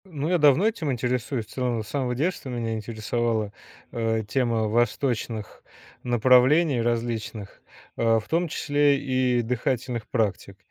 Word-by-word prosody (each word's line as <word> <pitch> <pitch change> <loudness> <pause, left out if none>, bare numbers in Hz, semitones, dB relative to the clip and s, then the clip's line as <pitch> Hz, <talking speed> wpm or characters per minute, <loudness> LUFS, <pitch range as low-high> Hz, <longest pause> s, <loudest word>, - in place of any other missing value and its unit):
Ну, 155 -4 -4
я 180 -1 +2
давно 150 +7 +5
этим 170 -10 -1
интересуюсь. 125 -1 -2
В - - -25
целом, 125 -4 -1
с - - -14
самого 125 +1 -2
детства 155 0 -2
меня 115 -2 -3
интересовала, 110 0 -2 0.4
э, 110 -1 -1
тема 115 -1 0
восточных 115 -1 -1 0.4
направлений 130 +4 +4
различных, 115 -3 -3 0.4
э, 115 -1 +3
в 110 - -12
том 170 +2 +1
числе 145 -2 +2
и 130 -3 +1
дыхательных 120 0 -2
практик. 100 -4 -2
120 Hz, 135 wpm, -25 LUFS, 115-135 Hz, 0.4 s, давно